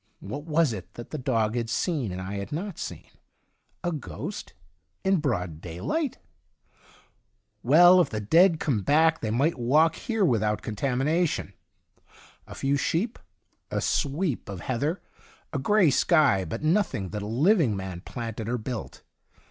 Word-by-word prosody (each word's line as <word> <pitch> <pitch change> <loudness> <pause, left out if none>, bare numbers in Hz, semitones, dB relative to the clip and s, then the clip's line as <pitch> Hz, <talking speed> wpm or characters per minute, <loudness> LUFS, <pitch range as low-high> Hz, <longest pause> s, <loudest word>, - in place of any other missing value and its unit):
What 140 +9 -6
was 160 -5 +2
it 95 -1 -9
that 120 - -9
the 155 - -4
dog 115 -4 0
had 120 -2 -2
seen 130 - -1
and 90 - -5
I 95 +2 -5
had 100 - -6
not 175 +4 -4
seen? - - -6 0.8
A 175 - 0
ghost? 115 - -6 0.5
In 190 0 +3
broad 90 - -2
daylight? 95 - -3 1.4
Well, 175 +7 +7
if - - 0
the 110 - -3
dead 165 - +4
come 120 -9 0
back 160 +7 +3
they 110 - -2
might 135 +7 +1
walk 150 +7 +4
here 225 +2 -1
without 105 - +1
contami 125 +4 -1
nation. 165 +2 0 0.9
A - - -9
few 140 +1 0
sheep, 185 +11 -1 0.5
a - - -1
sweep 145 - -1
of 95 -3 -6
heather, 145 +8 -2 0.5
a 140 - -1
gray 190 +2 +4
sky, 140 - +3
but 80 - -5
nothing 155 - +1
that 105 +2 -5
a 100 - -5
living 140 - +3
man 95 -2 -6
planted 115 0 -6
or 125 - 0
built. 120 0 -6
135 Hz, 155 wpm, -26 LUFS, 105-165 Hz, 1.4 s, Well